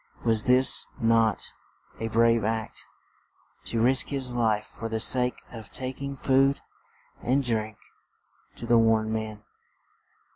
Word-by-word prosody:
Was 110 -2 +1
this 125 +1 +5
not 115 -1 +1 0.5
a 115 - -3
brave 115 0 +2
act? 110 +1 -4 0.8
To 115 - -3
risk 130 +3 +3
his 130 -3 -3
life 110 -3 0
for 115 - -8
the 110 0 -3
sake 125 +2 +2
of 115 -3 -11
tak 130 +1 -7
ing 140 0 -5
food 135 +1 +2 0.6
and 135 +3 0
drink 110 -3 -2 0.8
to - - -9
the 115 0 +3
worn 110 -1 +1
men. 110 -1 -5
115 Hz, 135 wpm, -26 LUFS, 110-125 Hz, 0.8 s, this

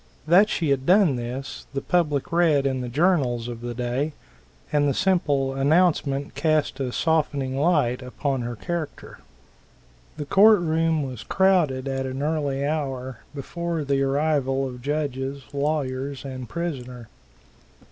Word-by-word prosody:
That 185 +7 +5
she 160 -4 0
had 135 -1 0
done 185 -6 +5
this, 125 +3 -6
the - - +1
public 150 -6 0
read 165 -5 +3
in 130 -1 0
the 125 - -4
journals 130 -5 +1
of 120 -1 -7
the 120 0 -5
day, 125 +5 -2 0.6
and 145 -1 +3
the 140 - 0
simple 145 -8 +1
announcement 140 -1 +2
cast 155 -3 0
a 130 -2 -2
softening 145 -4 0
light 145 -6 +2
upon 130 +1 -2
her 120 0 -4
character. 170 +5 -5 1.0
The 150 - -4
court 205 +6 +6
room 160 -1 +1
was 130 -4 -6
crowded 170 -9 +2
at 135 -1 -2
an 130 +2 -4
early 145 -3 -1
hour, 135 -5 -3 0.2
before 170 +3 -3
the 140 -1 0
arrival 135 -1 +1
of 125 -1 -8
judges, 140 -1 -3
lawyers 140 -2 -2
and 130 -3 -7
prisoner. 125 -8 -5
140 Hz, 140 wpm, -24 LUFS, 130-160 Hz, 1.0 s, court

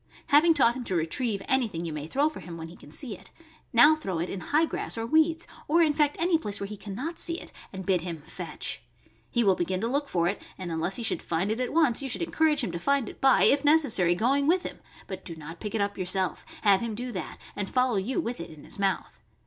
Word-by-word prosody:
Having 320 +2 +6
taught 240 -4 +4
him 260 - -5
to 190 - -2
retrieve 195 +6 -1
anything 225 -11 0
you 165 - -4
may 150 0 -5
throw 280 - +2
for 310 - -6
him 170 -1 -8
when 165 0 -7
he 170 - -12
can - - -15
see 215 - -4
it, - - -15 0.4
now 295 +7 +7
throw 195 - -4
it 170 +2 -2
in 195 - -4
high 300 - +2
grass 315 - -3
or 225 - -2
weeds, 320 +5 +2 0.2
or 335 +3 +4
in 305 -2 +3
fact 295 -1 +2
any 335 -1 +3
place 205 -9 -3
where 200 - -3
he 210 +1 -6
can 200 -1 -8
not 325 - -4
see 335 +1 0
it, - - -11 0.2
and 190 -1 -7
bid 185 -3 +2
him 165 -3 -6
"fetch." - - -5 0.5
He 240 - +1
will 195 -3 +5
begin 185 +1 -1
to 225 - 0
look 285 +3 -1
for 170 -1 +1
it, 200 - -2 0.2
and 180 -2 -5
unless 165 +4 -1
he 240 - -1
should - - +1
find 175 +5 -1
it 225 - -2
at 250 - -1
once, 300 -8 +3
you 270 - -3
should 255 - 0
encourage 315 -4 +2
him - - -2
to 170 - -4
find 275 +3 +1
it - - -13
by, 270 -1 +5
if 280 +1 +4
necessary, 280 - +4
going 275 +8 +2
with 360 +3 +3
him, - - -6 0.3
but 190 -1 -7
do 170 - -7
not 160 +2 -9
pick 210 0 -5
it 215 - +1
up 200 0 -2
yourself; 185 0 0 0.2
have 200 -2 +5
him 230 -2 -3
do 245 +3 -4
that 190 - -5 0.2
and 205 -1 -3
follow 250 -4 +2
you 230 - -1
with 245 -7 -3
it 170 - -6
in 155 -2 -13
his - - -3
mouth. 195 -1 -1
225 Hz, 265 wpm, -27 LUFS, 185-285 Hz, 0.5 s, now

